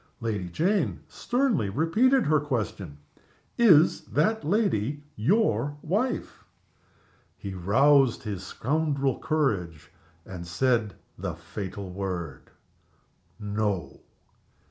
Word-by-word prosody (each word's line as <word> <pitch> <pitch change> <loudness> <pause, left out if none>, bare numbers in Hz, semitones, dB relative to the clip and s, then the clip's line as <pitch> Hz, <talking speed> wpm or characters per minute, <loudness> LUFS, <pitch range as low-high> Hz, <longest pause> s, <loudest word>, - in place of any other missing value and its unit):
Lady 105 -6 -3
Jane 185 - 0
sternly 245 - 0
repeated 220 - +2
her 155 0 +3
question. 110 - -4 0.6
"Is 175 -9 +5
that 220 +1 0
lady 150 - 0
your 145 - +1
wife?" 215 +10 -2 0.9
He 100 - -6
roused 130 +8 +3
his 100 -4 -5
scoundrel 140 +4 -1
courage, 90 - -1 0.3
and 85 -2 -8
said 110 +1 0 0.2
the - - -4
fatal 100 -1 -7
word: 90 -7 -5 0.9
"No!" 105 -7 -2
120 Hz, 90 wpm, -27 LUFS, 95-160 Hz, 0.9 s, Is